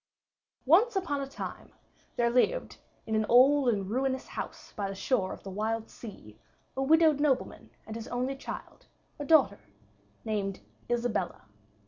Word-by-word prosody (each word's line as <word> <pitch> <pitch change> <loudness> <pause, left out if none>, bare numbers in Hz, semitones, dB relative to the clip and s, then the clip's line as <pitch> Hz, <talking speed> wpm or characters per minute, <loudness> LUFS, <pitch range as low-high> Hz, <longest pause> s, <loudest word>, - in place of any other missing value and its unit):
] - - -63 0.2
Once 395 - +5
upon 325 -7 -1
a 275 - -4
time 275 - -7 0.4
there 235 -1 +2
lived 375 - +1 0.3
in 220 - -4
an 215 0 +3
old 265 +2 +6
and 200 -3 -1
ruinous 260 +2 -1
house - - -7
by 200 -2 -2
the 195 - -5
shore 195 -2 0
of - - -9
the 195 - -7
wild 220 +3 -2
sea, 110 - -11 0.4
a 265 - -1
widowed 310 +1 +5
nobleman 290 -3 0 0.2
and 220 - -7
his 230 0 -6
only 255 +2 -2
child, 270 - -8 0.3
a 290 - -4
daughter 275 -11 +4 0.7
named 200 -3 -2 0.3
Isabella. 240 -6 -1
245 Hz, 155 wpm, -29 LUFS, 215-280 Hz, 0.7 s, old